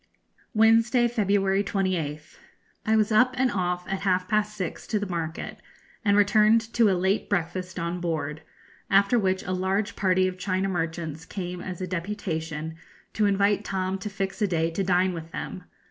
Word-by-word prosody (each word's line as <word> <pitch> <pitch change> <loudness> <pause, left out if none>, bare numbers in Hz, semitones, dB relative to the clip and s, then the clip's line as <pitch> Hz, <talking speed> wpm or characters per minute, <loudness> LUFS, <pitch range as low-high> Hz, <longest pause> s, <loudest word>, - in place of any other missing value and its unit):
Wednesday, 230 +2 +5
February 200 -3 +1
28th. 180 - -2 0.5
I 220 - +4
was 215 0 +2
up 255 +4 +4
and 255 -1 +2
off 180 -2 -1
at 195 - -2
half 185 -2 +1
past 210 0 0
six 185 -5 -4
to 215 - 0
the 205 - -2
market, 165 -4 -4 0.4
and 205 -2 +3
returned 215 +2 +4
to 230 -3 +4
a 190 - +2
late 190 +3 0
breakfast 185 -1 -2
on 170 +1 -2
board; 155 -3 -2 0.5
after 200 +4 +4
which 190 -2 0
a 185 - -4
large 190 +3 -1
party 185 -1 +2
of 185 0 -5
China 190 0 0
merchants 165 -3 -3
came 180 -1 -5
as 185 -1 -6
a - - -1
deputation 165 -4 -4 0.4
to 210 -1 +2
invite 200 +1 +2
Tom 190 0 -2
to 210 - -5
fix 195 +1 -4
a 210 - +3
day 165 -2 0
to 195 +4 -1
dine 185 0 +2
with 165 -1 -7
them. 180 +2 -6
190 Hz, 175 wpm, -26 LUFS, 175-205 Hz, 0.5 s, Wednesday